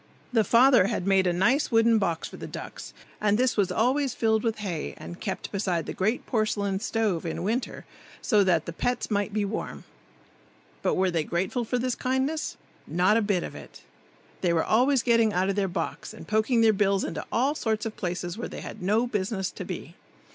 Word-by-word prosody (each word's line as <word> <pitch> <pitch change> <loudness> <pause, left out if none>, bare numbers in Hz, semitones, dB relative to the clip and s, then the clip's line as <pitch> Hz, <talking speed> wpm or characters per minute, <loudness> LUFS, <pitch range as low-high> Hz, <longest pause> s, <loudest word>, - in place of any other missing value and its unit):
The 225 -2 +4
father 240 -1 +5
had 180 - -2
made 195 -1 +3
a - - +3
nice 235 - +2
wooden 225 -1 +4
box 170 -5 -1
for - - -11
the - - -7
ducks, - - -8 0.3
and 210 0 +3
this 255 +1 +2
was 200 -4 +1
always 260 +3 +1
filled 220 -1 +2
with 225 -2 0
hay 185 -7 -4
and 175 - -9
kept 190 - -4
beside 185 -4 -1
the - - -5
great 215 +6 -1
porcelain 205 -4 0
stove 215 -5 -1
in 165 0 -4
winter, 230 +6 -2 0.3
so 210 -4 +3
that 170 -4 +2
the 170 - -5
pets 245 +6 -2
might 205 0 0
be 205 0 0
warm. 205 +2 -5 1.0
But - - +1
were 185 0 +2
they 165 -2 0
grateful 185 +10 -1
for 250 - -1
this 250 0 0
kindness? 265 +6 -1 0.3
Not 180 +4 +3
a 230 - +3
bit 200 -4 0
of - - -6
it. - - -12 0.6
They 175 -2 +2
were 160 - +1
always 255 +3 +3
getting 230 -3 +3
out 185 +2 +1
of 195 - 0
their 200 -1 +1
box 180 - -4
and - - -11
poking 220 +3 +2
their 220 -1 +5
bills 195 -1 +2
into - - -4
all 265 +5 +2
sorts 220 -7 -1
of 225 - -4
places 175 +1 -4
where - - -4
they - - -7
had - - -8
no 210 +6 +2
business 200 -4 -2
to - - -7
be. - - -7
210 Hz, 205 wpm, -27 LUFS, 190-235 Hz, 1.0 s, father